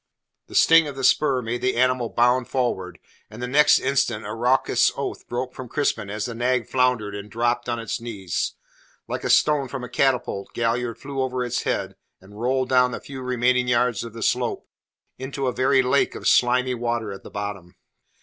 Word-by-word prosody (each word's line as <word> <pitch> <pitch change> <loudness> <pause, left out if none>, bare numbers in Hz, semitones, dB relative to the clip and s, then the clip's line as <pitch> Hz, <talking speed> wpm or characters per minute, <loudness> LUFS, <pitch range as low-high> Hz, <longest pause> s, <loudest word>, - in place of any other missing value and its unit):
The - - -11
sting 165 -1 +6
of 140 - -6
the 135 - -6
spur 130 0 +3
made 120 +2 -3
the 130 0 0
animal 125 -1 +1
bound 120 +1 +2
forward, 105 -8 -2 0.3
and 110 +2 -11
the 125 - -3
next 150 +4 +5
instant 130 -5 0
a - - -5
raucous 125 +3 +2
oath - - -5
broke 125 +1 -4
from 130 -2 -8
Crispin 140 -8 -1
as 105 +1 -3
the 120 - -4
nag 120 0 0
floundered 125 -5 +1
and 100 +1 -7
dropped 120 +2 -1
on 120 - -1
its 115 -1 -4
knees. 100 -7 -3 0.5
Like - - -4
a - - -2
stone 145 -3 +3
from 125 0 -6
a 125 - -7
catapult 125 -7 -1
Galliard 115 0 -1
flew 135 +2 -5
over 130 -1 -1
its 125 0 -2
head - - -2 0.2
and 105 +3 -13
rolled 130 +1 0
down 125 -1 +4
the - - -5
few 135 -2 -9
remaining 125 0 +1
yards 125 -1 +1
of 115 -2 -8
the 115 -1 -6
slope - - -1 0.5
into 135 +1 -4
a 125 - 0
very 130 +1 +3
lake 130 +2 +1
of - - -4
slimy 125 +1 +3
water 120 -3 -2
at 95 - -8
the - - -11
bottom. 100 -4 -6
125 Hz, 195 wpm, -23 LUFS, 115-130 Hz, 0.5 s, sting